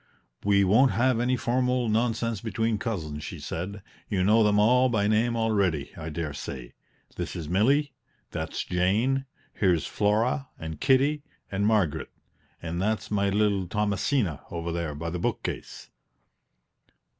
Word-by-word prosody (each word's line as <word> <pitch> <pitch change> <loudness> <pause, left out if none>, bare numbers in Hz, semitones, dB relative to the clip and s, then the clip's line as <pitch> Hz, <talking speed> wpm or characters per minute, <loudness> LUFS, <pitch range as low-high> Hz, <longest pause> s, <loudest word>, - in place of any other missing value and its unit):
"We 100 -1 +4
won't 110 +8 +4
have 125 0 +2
any 125 +1 +1
formal 125 0 +1
nonsense 115 -1 0
between 110 -1 -1
cousins," 80 -10 -4
she - - -6
said; 95 +4 -5 0.3
"you 95 -3 +1
know 110 +4 +5
them 105 -1 +3
all 125 +5 +5
by 105 -4 +1
name 115 +3 +2
already, 100 -10 0
I 80 -1 -6
dare 80 -1 -4
say. 65 -3 -7 0.4
This - - -4
is 80 - -5
Milly; 135 - +2 0.4
that's - - -3
Jane; 110 +10 +1 0.3
here's 85 -7 +2
Flora, 115 +7 +1
and 80 -1 -7
Kitty, 140 +3 +3 0.3
and 100 +1 +1
Margaret; 105 -9 +1 0.5
and 85 +1 -3
that's 105 +1 -1
my 100 -1 +2
little 100 -2 +1
Thomasina 105 - 0
over 85 0 -4
there 85 -3 -3
by 85 +3 -4
the 90 - -3
book - - -1
case." - - -6
105 Hz, 145 wpm, -27 LUFS, 90-115 Hz, 0.5 s, know